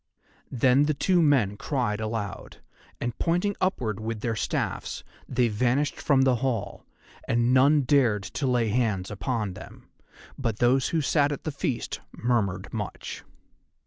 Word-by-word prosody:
Then 130 +3 +3
the 150 0 0
two 180 +4 +2
men 125 -10 +3
cried 120 -6 -1
aloud, 110 -3 -4 0.4
and 120 -1 -3
pointing 180 +4 +1
upward 120 - 0
with 110 0 -4
their 115 -1 -1
staffs - - -3 0.3
they 125 -1 +2
vanished 125 +6 0
from 135 -2 +3
the 130 -2 +3
hall, 125 -4 -3 0.4
and 120 +2 +2
none 140 +3 +5
dared 125 -7 +2
to 115 +9 -3
lay 120 -3 +2
hands 105 -4 0
on 105 0 -2
them, 95 0 -12 0.5
but 115 -6 -1
those 125 +3 +3
who 165 - 0
sat 145 0 +2
at 145 - -5
the 155 - -2
feast 135 -4 -3
murmured 100 -6 -1
much. 105 -3 -5
120 Hz, 145 wpm, -26 LUFS, 110-140 Hz, 0.5 s, none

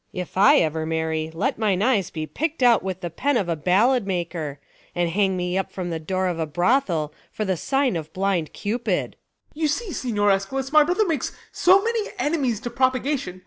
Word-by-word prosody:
If 180 -3 -6
I 265 +10 +6
ever 160 - +1
marry, 160 -1 -1
let 165 +6 -2
mine 205 -3 +1
eyes 220 -7 +2
be 155 -1 -4
Pickt 310 - -3
out 240 -3 +5
with 190 -1 -5
the 175 -2 -4
pen 280 - 0
of 195 - -1
a 170 - 0
ballad 200 - +2
maker, 170 -6 -3 0.4
And 175 -1 0
hang 190 0 +1
me 180 +1 -1
up 195 - -5
at 180 -2 -3
the 165 - -3
door 185 +4 -2
of 175 -2 -1
a 160 - -1
brothel, 175 - +1 0.2
For 215 - -3
the 190 -1 0
sign 270 - 0
of 160 -2 -5
blind 190 -4 -1
cupid. 230 +4 -2
Ben. - - -26 0.5
You 310 - +3
see, 375 +5 -2
Signior 205 -5 +1
Eschalus, 265 +8 -1
my 305 0 +7
brother 360 +7 +1
makes 315 -8 -2 0.2
So 380 +2 +4
many 455 -2 -1
enemies 285 - 0
to 240 - -5
propagation. 255 -6 0
195 Hz, 205 wpm, -23 LUFS, 175-265 Hz, 0.5 s, my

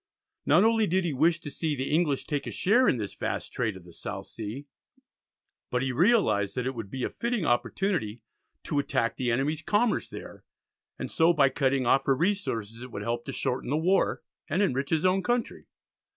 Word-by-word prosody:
Not 165 +7 +6
only 225 -1 +3
did 185 +1 +1
he 165 - -1
wish 160 +5 +3
to 145 - -7
see 155 -1 -2
the 130 +1 -3
English 150 -3 +1
take 145 -3 -3
a - - -3
share 240 +7 +3
in - - +3
this 105 -3 -4
vast - - -4
trade 110 -5 -1
of 95 - -14
the 90 - -14
South - - -6
Sea, 115 +6 -7 1.0
but 125 +1 0
he 135 - 0
realised 120 - +3
that 125 - -2
it 130 - -1
would 115 -5 -6
be 130 +3 -4
a - - 0
fitting 235 -6 -2
opportunity 120 - 0 0.4
to 145 - -1
attack 135 -5 0
the 125 -2 -1
enemies' 140 +6 0
commerce 215 +2 +1
there, - - -10 0.5
and - - -5
so 165 +1 +4
by 140 -4 +4
cutting 135 -1 +1
off 135 +3 +3
her 135 - +4
resources 125 - -1
it 125 - -8
would 105 - -5
help 120 +1 -2
to 135 - -4
shorten 130 -2 -2
the 145 - +1
war, 185 +5 +1 0.3
and 190 +5 +2
enrich 135 -5 0
his 160 +1 +1
own 185 +1 +3
country. 240 +3 -2
140 Hz, 205 wpm, -28 LUFS, 120-175 Hz, 1.0 s, Not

